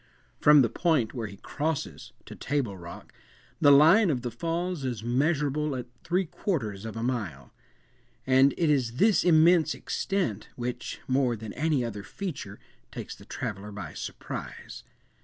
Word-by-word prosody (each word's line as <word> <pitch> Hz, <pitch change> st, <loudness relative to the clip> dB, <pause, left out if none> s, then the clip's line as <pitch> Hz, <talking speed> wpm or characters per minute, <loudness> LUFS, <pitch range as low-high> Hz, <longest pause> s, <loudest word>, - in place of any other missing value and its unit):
From 150 Hz, -2 st, +7 dB
the -, -, +3 dB
point 155 Hz, -9 st, +1 dB
where 115 Hz, -4 st, -4 dB
he 100 Hz, -1 st, -11 dB
crosses, 150 Hz, +7 st, -4 dB
to -, -, -9 dB
Table 135 Hz, -8 st, -2 dB
Rock, 85 Hz, -2 st, -11 dB, 0.5 s
the 145 Hz, -, +6 dB
line 165 Hz, +9 st, +7 dB
of 125 Hz, -5 st, -1 dB
the 120 Hz, -, -3 dB
Falls 170 Hz, +5 st, -3 dB
is 120 Hz, -5 st, -3 dB
measurable 145 Hz, +3 st, 0 dB
at 125 Hz, -2 st, -4 dB, 0.2 s
three 185 Hz, +2 st, +1 dB
quarters 130 Hz, -, -3 dB
of 110 Hz, -, -6 dB
a 115 Hz, -, -3 dB
mile; 105 Hz, -, -3 dB, 0.7 s
and 130 Hz, +1 st, +4 dB
it 165 Hz, -3 st, +2 dB
is 125 Hz, -5 st, +1 dB
this 205 Hz, -, +3 dB
immense 165 Hz, -1 st, +5 dB
extent 190 Hz, -, -2 dB
which, 125 Hz, 0 st, -5 dB
more 130 Hz, -2 st, +2 dB
than 110 Hz, -1 st, -8 dB
any 150 Hz, -5 st, 0 dB
other 105 Hz, -3 st, -5 dB
feature, 140 Hz, -, -6 dB, 0.3 s
takes -, -, -7 dB
the -, -, -15 dB
traveller 105 Hz, 0 st, -5 dB
by 100 Hz, -7 st, -7 dB
surprise. -, -, -7 dB
135 Hz, 155 wpm, -28 LUFS, 115-160 Hz, 0.7 s, From